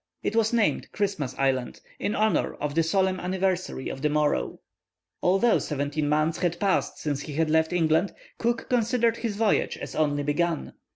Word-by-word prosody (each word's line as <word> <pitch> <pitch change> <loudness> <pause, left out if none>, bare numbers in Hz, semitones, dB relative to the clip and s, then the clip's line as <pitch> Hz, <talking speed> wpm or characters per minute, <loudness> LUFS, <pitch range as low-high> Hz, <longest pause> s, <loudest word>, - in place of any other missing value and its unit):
It 220 - -1
was 225 -1 +3
named 230 -3 +1
Christmas 195 - -2
Island, 130 -2 0 0.2
in 205 - -1
honour 215 0 +1
of 145 -1 -3
the 165 - +3
solemn 185 +3 +1
anniversary 185 -5 -1
of 135 - -5
the 150 - +2
morrow. 150 - 0 0.6
Although 195 +6 +3
seventeen 145 0 -2
months 155 +2 +1
had 175 -1 -1
passed 195 -2 +1
since 145 -2 -2
he 155 +2 -1
left 160 +1 +2
England, 165 +2 +2 0.3
Cook 235 0 -1
considered 235 -1 +2
his 225 -4 -3
voyage 220 0 +1
as - - -7
only 145 -2 +1
begun. 165 +3 -1
170 Hz, 165 wpm, -26 LUFS, 150-205 Hz, 0.6 s, was